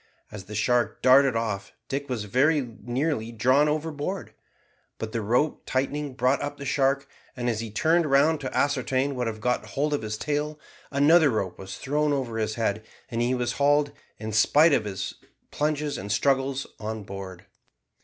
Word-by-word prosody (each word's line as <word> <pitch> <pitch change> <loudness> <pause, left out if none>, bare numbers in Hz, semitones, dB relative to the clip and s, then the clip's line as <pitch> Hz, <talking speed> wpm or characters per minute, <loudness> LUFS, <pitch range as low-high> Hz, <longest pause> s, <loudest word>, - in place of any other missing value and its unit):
As 105 -3 -8
the 105 - -8
shark 120 +3 +1
darted 130 0 +6
off 110 -3 -2
Dick 140 0 -3
was 120 -5 -2
very 135 +9 +3 0.2
nearly 120 0 -1
drawn 130 +6 +3
overboard, 155 +4 -3 0.6
but 110 - -5
the 115 - -2
rope 120 +8 +1
tightening 140 +1 -2
brought 130 +2 +2
up 145 - -4
the 140 - -7
shark; 140 +1 +1 0.3
and 120 0 -2
as 115 -3 0
he 115 0 -4
turned 160 +10 +2
round 145 +3 +4
to 130 - -4
ascertain 135 -1 +1
what 125 -2 -1
had 110 -1 -4
got 125 +3 0
hold 150 +2 -1
of 145 - 0
his 110 -1 -4
tail 150 +3 -2 0.3
another 150 +3 +5
rope 100 -6 -2
was 95 0 -7
thrown 150 +2 0
over 120 -5 -2
his 110 0 -1
head, 110 -2 -1 0.3
and 115 -1 -2
he 125 +2 +1
was 120 -1 -1
hauled, 145 0 +3 0.3
in 110 0 -5
spite 145 +9 +5
of 110 - +2
his 95 -2 -4 0.4
plunges 150 -1 -1
and 100 +2 -5
struggles, 135 +3 +1
on 110 0 -4
board. 95 -2 -8
130 Hz, 175 wpm, -26 LUFS, 110-145 Hz, 0.6 s, darted